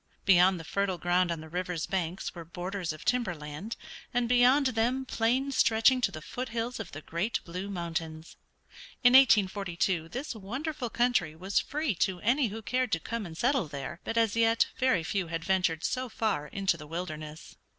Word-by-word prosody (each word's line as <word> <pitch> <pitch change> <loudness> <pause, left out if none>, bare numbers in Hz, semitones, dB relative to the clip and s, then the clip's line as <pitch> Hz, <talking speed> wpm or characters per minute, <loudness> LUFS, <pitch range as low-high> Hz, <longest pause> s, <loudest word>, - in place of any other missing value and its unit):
Beyond 185 -1 +5
the - - -7
fertile 195 +2 -1
ground 175 +1 +2
on 165 -2 -3
the 160 - -10
river's 180 -1 -3
banks 180 -1 -3
were 170 - -8
borders 175 +1 -4
of 155 - -10
timber 240 -8 +1
land, 150 +8 -6 0.4
and 240 0 +1
beyond 250 +4 +5
them 245 +4 0
plains 260 +3 0
stretching 230 +3 +4
to - - +2
the 155 - -8
foot 250 +6 -5
hills 230 +1 -3
of 210 -5 -6
the 145 +2 -8
great 175 +8 -1
Blue 180 +3 -5
Mountains. 165 -3 -5 0.7
In 245 - +7
1842 190 -8 +4
this 260 - -4
wonderful 250 +6 -4
country 235 -10 +1
was 190 +5 0
free 300 -4 -1
to 185 -2 +1
any 250 +4 +2
who 220 +2 -7
cared 255 +1 0
to 165 - +2
come 230 +3 -4
and 160 -1 -10
settle 250 - +1
there, 145 +3 -6
but 230 - -3
as 225 -2 +3
yet 230 0 +4
very 255 -10 +2
few 185 +1 -1
had 165 0 -4
ventured 180 -4 +1
so 255 0 -1
far 215 -10 -1
into 190 +1 0
the 150 -1 -10
wilderness. 155 -2 -6
195 Hz, 185 wpm, -29 LUFS, 170-240 Hz, 0.7 s, In